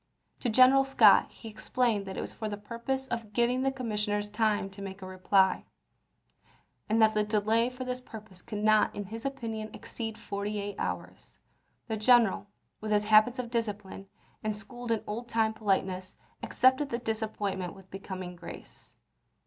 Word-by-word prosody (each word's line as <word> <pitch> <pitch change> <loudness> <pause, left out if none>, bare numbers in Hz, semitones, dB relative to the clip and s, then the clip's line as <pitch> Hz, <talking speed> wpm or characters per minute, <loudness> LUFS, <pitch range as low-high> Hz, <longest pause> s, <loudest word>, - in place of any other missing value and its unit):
To 245 - -1
General 255 +4 +6
Scott 225 -7 +6
he - - -12
explained 220 -1 -1
that 190 - -6
it - - -2
was - - -6
for 220 - -4
the 205 - -4
purpose 235 +6 -4
of 230 -3 -4
giving 240 +3 +2
the 270 0 +1
commissioners 210 -5 -2
time 210 -2 +1
to 195 +1 -11
make 195 0 -7
a - - -5
reply, 185 +1 +2 1.2
and 220 +1 +2
that 220 -1 +5
the 210 - +2
delay 215 +3 +2
for 255 0 -7
this 250 0 -4
purpose 215 -6 -11
could 210 -2 -5
not 215 0 +4
in 205 - -3
his 225 +5 -8
opinion 225 -6 -4
exceed 225 -2 -6
forty 205 -1 -4
eight 205 0 -4
hours. - - -5 0.5
The 220 -2 -2
general, 220 -3 +4 0.3
with 215 0 -4
his 210 0 +3
habits 215 +3 +5
of 245 -2 -4
discipline, 210 -4 -4 0.4
and 215 -1 -1
schooled 240 +3 -8
in 225 -2 0
old 235 +3 -5
time 220 -1 +1
politeness, 190 -3 -1 0.3
accepted 260 +3 +3
the 235 - -1
disappointment 210 -5 -3
with 190 -1 -16
becoming 185 -2 -6
grace. 170 -1 -12
215 Hz, 170 wpm, -29 LUFS, 205-235 Hz, 1.2 s, General